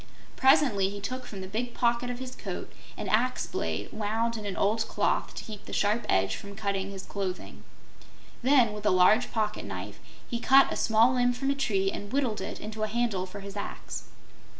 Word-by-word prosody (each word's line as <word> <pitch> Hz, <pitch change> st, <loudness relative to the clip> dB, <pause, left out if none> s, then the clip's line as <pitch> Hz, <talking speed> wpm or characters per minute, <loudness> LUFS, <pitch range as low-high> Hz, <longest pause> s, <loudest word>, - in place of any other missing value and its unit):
Presently 250 Hz, -7 st, +4 dB
he 200 Hz, 0 st, -6 dB
took 255 Hz, +6 st, -5 dB
from 195 Hz, -3 st, -7 dB
the 190 Hz, -, -6 dB
big 235 Hz, +5 st, -3 dB
pocket 240 Hz, 0 st, +1 dB
of 245 Hz, -, -3 dB
his 255 Hz, 0 st, -6 dB
coat -, -, -6 dB, 0.2 s
an -, -, -4 dB
axe 250 Hz, +4 st, +1 dB
blade, 80 Hz, +5 st, -3 dB
wound 225 Hz, +2 st, -1 dB
in 215 Hz, -2 st, -5 dB
an 195 Hz, -, -4 dB
old 220 Hz, +2 st, +1 dB
cloth -, -, 0 dB
to -, -, -5 dB
keep 210 Hz, -2 st, -9 dB
the -, -, -8 dB
sharp 210 Hz, +3 st, +1 dB
edge 95 Hz, 0 st, +2 dB
from 200 Hz, 0 st, -9 dB
cutting 200 Hz, -2 st, -2 dB
his 195 Hz, -1 st, -7 dB
clothing. 190 Hz, -2 st, -5 dB, 0.8 s
Then, 250 Hz, -4 st, +4 dB
with 210 Hz, 0 st, -3 dB
a -, -, +6 dB
large 185 Hz, +6 st, +5 dB
pocket 215 Hz, -1 st, -1 dB
knife, -, -, -6 dB, 0.3 s
he 235 Hz, -, -3 dB
cut 270 Hz, +3 st, +6 dB
a -, -, -3 dB
small 225 Hz, +3 st, +4 dB
limb 245 Hz, -1 st, +3 dB
from 270 Hz, +3 st, -1 dB
a -, -, +3 dB
tree 195 Hz, -8 st, +1 dB
and 205 Hz, 0 st, -6 dB
whittled 260 Hz, -6 st, 0 dB
it -, -, -5 dB
into 215 Hz, +1 st, -6 dB
a 215 Hz, -, +1 dB
handle 215 Hz, -4 st, -1 dB
for 200 Hz, +2 st, -8 dB
his 200 Hz, 0 st, -8 dB
axe. 200 Hz, -, -6 dB
215 Hz, 205 wpm, -28 LUFS, 200-245 Hz, 0.8 s, a